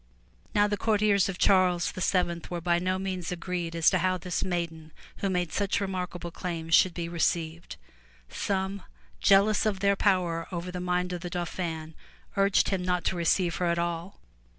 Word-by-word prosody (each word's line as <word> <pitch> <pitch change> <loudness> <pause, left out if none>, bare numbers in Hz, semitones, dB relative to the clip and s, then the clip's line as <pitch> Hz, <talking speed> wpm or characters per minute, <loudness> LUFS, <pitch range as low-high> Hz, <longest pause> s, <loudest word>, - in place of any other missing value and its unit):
Now 205 0 +5
the 205 0 -1
courtiers 210 -3 +2
of 185 - -4
Charles 185 -3 +3
VII 180 -2 0
were 175 - -3
by 170 0 +1
no 185 +1 0
means 185 -3 -3
agreed 175 -1 -3
as 165 -1 +1
to 185 - +2
how 185 +1 +1
this 180 0 -3
maiden 165 -3 -3 0.2
who 195 - -1
made 180 -3 -1
such 200 -1 0
remarkable 180 -3 -4
claims 165 -2 -4
should 180 0 +5
be 170 -1 -3
received. 170 -1 -1 0.5
Some, 190 - -2 0.4
jealous 200 +2 +4
of 200 -3 -1
their 200 0 +3
power 180 -5 +1
over 180 0 -4
the 180 - -5
mind 180 0 -1
of 175 - -4
the 175 - -5
Dauphin, 170 -2 -4 0.4
urged 195 -1 +3
him 195 -2 0
not 180 -1 0
to - - +1
receive 170 0 +1
her 180 - 0
at 170 0 +1
all. 170 +2 -3
180 Hz, 175 wpm, -28 LUFS, 170-190 Hz, 0.5 s, Now